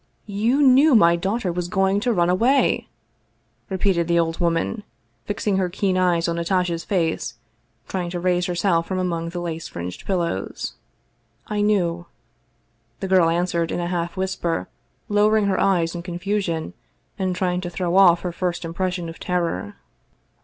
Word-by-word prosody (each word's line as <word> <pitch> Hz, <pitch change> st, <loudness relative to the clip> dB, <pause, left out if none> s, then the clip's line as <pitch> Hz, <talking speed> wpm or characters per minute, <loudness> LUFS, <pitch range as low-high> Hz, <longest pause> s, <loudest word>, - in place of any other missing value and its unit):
" -, -, -42 dB, 0.2 s
You 265 Hz, +6 st, +3 dB
knew 270 Hz, +2 st, +6 dB
my 170 Hz, -5 st, +6 dB
daughter 195 Hz, +2 st, -1 dB
was 175 Hz, 0 st, -3 dB
going 195 Hz, +1 st, +1 dB
to 245 Hz, +3 st, 0 dB
run 175 Hz, -6 st, +2 dB
away?" 250 Hz, +9 st, +2 dB, 0.8 s
re 190 Hz, -, -2 dB
peated 175 Hz, -3 st, +1 dB
the 170 Hz, 0 st, +2 dB
old 165 Hz, -1 st, 0 dB
woman, 170 Hz, +5 st, 0 dB, 0.4 s
fixing 205 Hz, -1 st, -1 dB
her 185 Hz, -2 st, +1 dB
keen 190 Hz, +1 st, 0 dB
eyes 175 Hz, -2 st, +2 dB
on 170 Hz, 0 st, -1 dB
Natasha's 170 Hz, -1 st, 0 dB
face, 165 Hz, -, -1 dB, 0.5 s
trying 180 Hz, -2 st, -3 dB
to 175 Hz, 0 st, -4 dB
raise 180 Hz, 0 st, +1 dB
herself 175 Hz, -1 st, +1 dB
from 190 Hz, -, -2 dB
among 170 Hz, -2 st, -2 dB
the 175 Hz, +1 st, -5 dB
lace 165 Hz, -2 st, -4 dB
fringed 90 Hz, +1 st, -7 dB
pillows. 170 Hz, -, -2 dB, 0.4 s
" 115 Hz, 0 st, -38 dB
I 205 Hz, -, +1 dB
knew," 175 Hz, -5 st, +1 dB, 0.9 s
the 195 Hz, -, -3 dB
girl 185 Hz, -3 st, +4 dB
answered 170 Hz, -1 st, 0 dB
in -, -, -2 dB
a 175 Hz, 0 st, -2 dB
half 170 Hz, +1 st, -3 dB
whisper, 185 Hz, -3 st, -2 dB, 0.4 s
lowering 210 Hz, +1 st, +3 dB
her 195 Hz, -1 st, +1 dB
eyes 175 Hz, -4 st, +2 dB
in 175 Hz, -, -5 dB
confusion, 175 Hz, -1 st, -2 dB, 0.5 s
and 185 Hz, -1 st, 0 dB
trying 180 Hz, -1 st, 0 dB
to 175 Hz, -, -4 dB
throw 175 Hz, 0 st, -2 dB
off 175 Hz, -3 st, +6 dB
her 180 Hz, -, -3 dB
first 175 Hz, 0 st, -3 dB
im 165 Hz, -, -5 dB
pression 180 Hz, -1 st, -2 dB
of 165 Hz, -, -9 dB
terror. 170 Hz, -, -2 dB
180 Hz, 170 wpm, -22 LUFS, 170-195 Hz, 0.9 s, knew